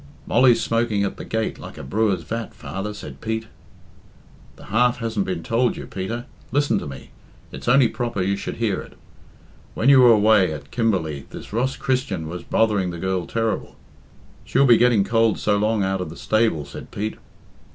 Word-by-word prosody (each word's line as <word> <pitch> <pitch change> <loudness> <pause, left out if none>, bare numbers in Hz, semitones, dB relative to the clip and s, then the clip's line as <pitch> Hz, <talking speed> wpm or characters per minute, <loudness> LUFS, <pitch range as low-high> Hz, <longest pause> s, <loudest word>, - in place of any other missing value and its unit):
"Molly's 120 -1 +4
smoking 115 -3 0
at 100 - -3
the - - -7
gate 110 0 -2
like - - -10
a - - -7
brewer's 100 +4 0
vat, 115 +7 -5
father," 95 +2 -5
said 75 -10 -10
Pete. 110 0 -2 1.1
"The - - -15
half 120 +2 +2
hasn't 115 -4 -2
been 90 -3 -3
told 120 +6 +1
you, - - -6
Peter. 110 +6 -5 0.3
Listen 145 +2 +2
to - - -6
me. 70 -1 -10 0.4
It's - - -9
only 125 0 +6
proper 120 -3 -3
you 100 +2 +1
should 100 - -5
hear 110 -5 -1
it. - - -13 0.8
When 125 - +2
you 135 -1 +8
were 120 -1 +8
away 105 -4 +5
at 70 -2 -8
Kim 115 -1 +1
berley 80 -8 -2
this - - -10
Ross 130 +4 0
Christian 115 -11 -1
was 85 +2 -6
bothering 105 -5 +1
the 85 - -5
girl 95 0 -2
terrible." 115 -1 -2 0.7
"She'll 135 +2 +2
be 120 -3 +7
getting 120 -4 +4
cold 115 0 +2
so 100 - +1
long 105 0 +1
out 95 0 -1
of 90 - -4
the 80 - -10
stable," 110 -9 +1
said 70 - -10
Pete. 105 +2 -4
110 Hz, 190 wpm, -22 LUFS, 95-115 Hz, 1.1 s, you